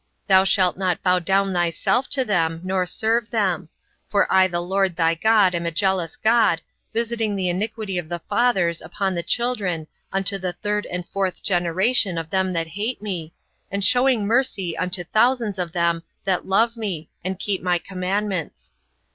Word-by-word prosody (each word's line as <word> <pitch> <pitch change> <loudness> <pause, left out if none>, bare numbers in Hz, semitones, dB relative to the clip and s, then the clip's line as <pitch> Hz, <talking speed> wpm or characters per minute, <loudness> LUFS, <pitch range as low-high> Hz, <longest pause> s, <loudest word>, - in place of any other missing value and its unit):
Thou 190 -2 +6
shalt 185 -1 +3
not 185 -3 -1
bow 180 -1 +3
down 195 +2 +1
thyself 175 +9 0
to 265 -2 +2
them, 165 -6 0
nor 185 -1 0
serve 225 +3 0
them; 185 -7 0 0.4
for 200 - +2
I 190 0 +6
the 175 -1 -2
LORD 190 0 0
thy 165 -1 +2
God 205 +1 +3
am 170 0 -2
a - - -1
jealous 185 -1 0
God, 220 -6 +3 0.3
visiting 225 -2 -1
the 185 -2 0
iniquity 205 0 -2
of 160 -2 -8
the 175 - -2
fathers 180 -4 +1
upon 190 +4 -2
the 170 - -2
children 200 -8 0 0.3
unto 195 +1 0
the 180 -1 -3
third 210 +3 -2
and 180 0 -5
fourth 195 -2 -2
generation 185 +2 +2
of 165 -1 -5
them 190 -1 +1
that 165 -1 -1
hate 210 +8 -3
me, 180 -6 -5 0.4
and 200 0 0
shewing 245 -4 +3
mercy 205 -7 +1
unto 180 0 -1
thousands 220 +1 +1
of 175 -2 -2
them 170 -1 +1 0.2
that 190 -2 0
love 225 +5 +3
me, 190 -9 -4 0.2
and 185 +1 -3
keep 195 0 -2
my 180 -1 +1
commandments. 190 0 -3
190 Hz, 170 wpm, -22 LUFS, 175-210 Hz, 0.4 s, Thou